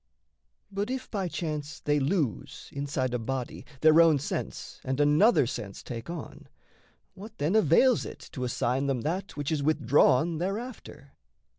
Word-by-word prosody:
But 200 +2 -2
if 260 0 -4
by 195 -4 -1
chance 155 -3 -4
they 150 0 +1
lose, 140 - -2
inside 140 -3 -2
a 125 - 0
body, 130 +2 -4
Their 155 +1 +7
own 165 -3 +5
sense 140 - -5
and 130 +1 -2
another 150 - +5
sense 110 -4 -6
take 115 +1 -7
on, 170 -3 -8 0.7
What, 205 +3 -11
then, 155 +8 0
avails 220 - +4
it - - -9
to 130 - -5
assign 125 +2 0
them 135 -3 0
that 180 +8 -3
Which 145 0 -2
is 155 -2 0
withdrawn 150 +2 +3
thereafter? 195 - -5
150 Hz, 150 wpm, -28 LUFS, 135-180 Hz, 0.7 s, Their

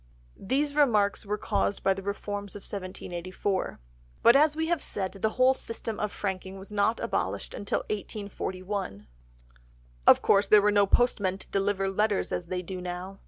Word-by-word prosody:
These 285 +7 0
remarks 215 -9 +2
were 210 +1 -1
caused 200 -1 -1
by 195 - +4
the 195 - -7
reforms 200 0 -4
of 205 - -7
1784. 185 0 -4 0.4
But, 235 - +8
as 300 +1 +5
we 320 +1 0
have 335 -2 0
said, 190 -2 -2
the 205 +2 -1
whole 255 +1 +6
system 230 -3 -5
of 210 -1 -1
franking 190 -1 -4
was 195 +2 -10
not 210 +2 +1
abolished - - -2
until 200 - -2
1841. 200 - -5 1.0
Of - - +7
course 200 0 +4
there 210 -1 +6
were 210 - +4
no 205 -1 +4
postmen 200 -5 +2
to - - -11
deliver 195 0 +1
letters 205 +1 0
as 175 - -3
they 180 0 -3
do 185 +1 -6
now. 180 +2 -6
200 Hz, 165 wpm, -28 LUFS, 190-215 Hz, 1.0 s, But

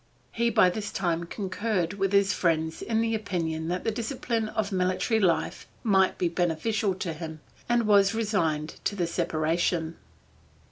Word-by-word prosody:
He 235 0 +1
by 185 -5 +5
this 210 +3 -4
time 170 -3 -1
concurred 190 -1 -2
with 195 -1 -1
his 200 -1 +4
friends 160 -2 0
in 225 -1 0
the 225 0 0
opinion 165 -7 -2
that 180 +1 -2
the 225 - 0
discipline 230 -1 -2
of 220 -2 -2
military 185 +4 +1
life 180 -5 0 0.2
might 190 -4 +3
be 180 - +1
beneficial 180 +4 0
to 180 -3 -3
him, 160 0 -7 0.3
and 240 -1 +3
was 200 0 +4
resigned 165 -9 -1
to 205 - 0
the 180 -3 0
separation. 165 0 0
185 Hz, 155 wpm, -27 LUFS, 170-215 Hz, 0.3 s, by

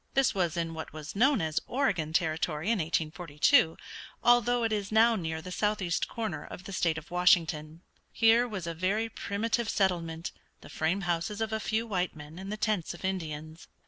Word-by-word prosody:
This 270 -1 +3
was 175 -3 0
in 165 -1 -1
what 160 0 -7
was 155 +2 -8
known 265 +5 +4
as 160 -1 0
Oregon 200 - 0
Territory 160 +2 0
in 230 - +1
1842, 160 0 +2 0.5
although 240 0 +4
it 225 -1 +1
is 205 -1 -2
now 225 +2 +5
near 160 -4 -3
the 180 - -7
southeast 195 -3 0
corner 225 -2 -4
of 180 - -9
the 195 - -8
state 165 -3 +1
of 160 +1 -9
Washington. 165 -3 +2 0.3
Here 230 +2 +4
was 195 -7 -5
a 170 - -3
very 200 +7 0
primitive 225 +3 -2
settlement, 170 -4 0 0.3
the - - -12
frame 165 +5 0
houses 175 +3 -1
of 220 0 -1
a 220 - 0
few 220 +1 -1
white 185 -6 -1
men 150 +3 -10
and 195 +1 -6
the 215 - -3
tents 210 -6 -1
of 180 - -7
Indians. 160 -4 -4
180 Hz, 185 wpm, -29 LUFS, 160-215 Hz, 0.5 s, now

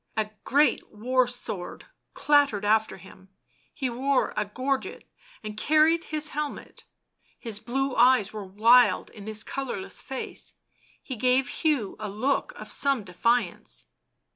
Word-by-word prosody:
A 215 -1 -1
great 290 +3 +2
war 250 +4 +1
sword 225 -7 -6 0.3
clattered 285 -9 +3
after 220 -2 +2
him, 190 +1 -16 0.4
he 270 - -3
wore 260 +3 0
a 210 - 0
gorget 260 +6 -3 0.4
and 215 -1 -6
carried 310 +7 +3
his 305 -1 -1
helmet; 295 0 -6 0.5
his 225 -4 -5
blue 260 +4 -2
eyes 240 -4 +4
were 210 -1 -5
wild 215 +2 +4
in 210 -1 -11
his 215 0 -3
colourless 260 -8 -5
face; 265 -1 -6 0.5
he 260 - -5
gave 250 +3 +2
Hugh 290 - 0
a 215 -1 -4
look 250 +8 -1
of - - -10
some 275 -5 0
defiance. 180 - -1
240 Hz, 135 wpm, -26 LUFS, 210-270 Hz, 0.5 s, eyes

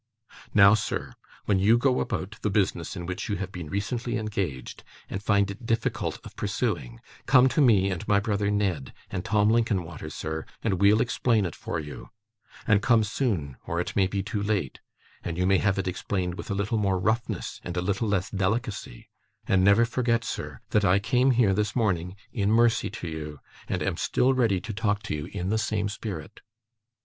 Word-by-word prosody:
Now, 100 0 +8
sir, 110 - -2 0.3
when 100 -2 +2
you 110 +5 +5
go 130 +1 +2
about 105 -2 -3
the 105 - 0
business 95 -4 0
in 90 -2 -5
which 90 +4 -4
you 105 - 0
have 95 0 -4
been 85 -5 -7
recently 115 +6 -2
engaged, 95 - -4 0.3
and 95 - -3
find 100 -1 +2
it 100 - -10
difficult 115 -1 -1
of - - -11
pursuing, 85 - -2 0.3
come 130 -1 +6
to 150 - +1
me 100 -7 +4
and 90 - -4
my 100 -1 +4
brother 100 -1 0
Ned, 95 -10 -1 0.2
and 90 -2 -3
Tim 105 -2 +2
Linkinwater, 95 -10 -1
sir, 80 +1 -5 0.2
and 95 -4 0
we'll 105 +3 +5
explain 115 -4 +1
it 85 - -4
for 85 - -4
you 75 -2 -8 0.6
and 105 -2 +4
come 115 -1 +4
soon, 100 - -2
or 85 - -1
it 90 - -3
may 95 -2 +3
be 95 +1 -2
too 105 0 -3
late, 100 -9 -1 0.4
and 85 -1 -4
you 90 - +1
may 95 0 +4
have 100 -2 +1
it 95 -1 -1
explained 90 0 -2
with 90 - -8
a 100 - -1
little 100 +3 0
more 100 -2 +1
roughness, 110 +5 -2
and 90 0 -5
a - - +3
little 100 +5 0
less 100 -1 0
delicacy 100 - -2 0.4
and 95 -1 +3
never 100 +4 +6
forget, 115 -1 0
sir, - - -5
that 105 - +3
I 95 0 +4
came 125 +6 +2
here 120 -6 +4
this 105 +2 -1
morning, 95 -6 0 0.2
in 105 -3 +1
mercy 115 +1 +3
to 90 -2 -7
you, 75 -2 -6 0.3
and - - -1
am - - -1
still 130 +2 +2
ready 115 -7 +2
to 110 - -5
talk 105 -1 0
to 110 - -3
you 75 -1 -4
in 90 -1 -4
the 110 +1 +1
same 105 -2 -1
spirit. 100 -6 -7
100 Hz, 195 wpm, -27 LUFS, 90-110 Hz, 0.6 s, Now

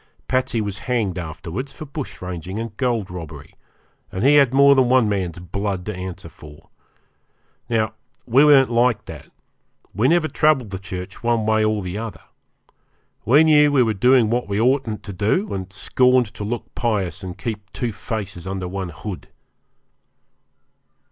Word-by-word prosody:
Patsey 130 -3 0
was 100 -1 -4
hanged 105 -8 0
afterwards 85 - -6
for 155 - -9
bush 140 -7 -7
ranging 90 +1 -5
and 115 +1 -5
gold 120 -8 -1
robbery, 80 -5 -9 0.6
and 95 - -3
he 140 - +6
had 140 -4 +5
more 140 +1 +6
than 130 -3 +3
one 125 -3 +4
man's 95 -5 -2
blood 95 +1 -4
to 105 - -4
answer 90 -1 -7
for. 75 +1 -15 1.0
Now 110 -2 0 0.3
we 130 +4 +5
weren't 140 -4 +6
like 120 -2 +2
that; - - -10 0.7
we 110 +7 +2
never 165 +1 +3
troubled 150 -10 +2
the 95 - -4
church 95 -1 -7
one 115 -2 +1
way 110 0 +2
or 110 -2 0
the 90 +3 -4
other. 115 -1 -7 1.0
We 140 +8 +6
knew 150 -2 +5
we 135 -3 +4
were 110 -2 0
doing 125 +2 +4
what 120 -2 -1
we 100 +1 0
oughtn't 120 -2 +1
to 100 - -7
do, 110 - 0
and 95 -1 -5
scorned 125 +3 +2
to - - -6
look 115 +3 -5
pious 100 -5 -1
and 90 -2 -7
keep 105 -3 -6
two 120 -2 -3
faces 100 -3 -5
under 95 -1 -3
one 95 0 -4
hood. 85 +2 -7
110 Hz, 165 wpm, -21 LUFS, 95-125 Hz, 1.0 s, he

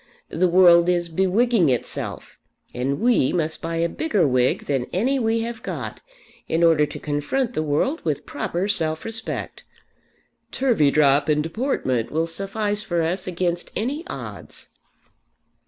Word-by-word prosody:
The 185 +2 +1
world 175 -1 +6
is 175 -1 0
bewigging 190 - +2
itself, 125 -2 -4 0.3
and 130 +3 -2
we 230 - +3
must 160 -3 -1
buy 165 0 -3
a 165 +1 +1
bigger 205 - 0
wig 125 -1 +1
than 135 -4 -1
any 260 +9 +1
we 225 -1 +1
have 230 0 -5
got, - - -6 0.5
in 165 +1 +1
order 160 -3 +4
to - - -8
confront 190 - -1
the - - -1
world 155 - 0
with 150 -4 -2
proper 175 +6 -3
self 160 -6 0
respect. 225 0 -5 0.9
Turveydrop 150 - +3
and 150 0 +2
deportment 165 - -1
will 160 +2 0
suffice 205 +4 -2
for 175 -6 -1
us 180 +4 -2
against 175 -1 -2
any 275 +9 -2
odds." - - -8
175 Hz, 140 wpm, -23 LUFS, 155-220 Hz, 0.9 s, world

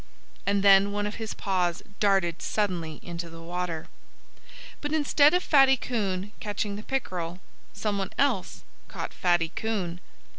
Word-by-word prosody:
And 200 0 +2
then 200 0 +7
one 205 0 -1
of 210 - -4
his 220 - -4
paws 180 -3 0 0.2
darted 190 -5 +2
suddenly 175 -7 -1
into 170 -1 -6
the 165 0 -10
water. 170 -1 -4 1.0
But 295 +1 -2
instead 295 +1 +5
of 360 - +2
Fatty 270 -2 +6
Coon 205 -5 -2
catching 205 -1 -3
the 205 - -6
pickerel, 180 -9 -3 0.3
someone 200 -2 -2
else 255 -10 0 0.2
caught - - -6
Fatty 175 -2 +2
Coon. 185 -4 -3
195 Hz, 140 wpm, -27 LUFS, 175-215 Hz, 1.0 s, then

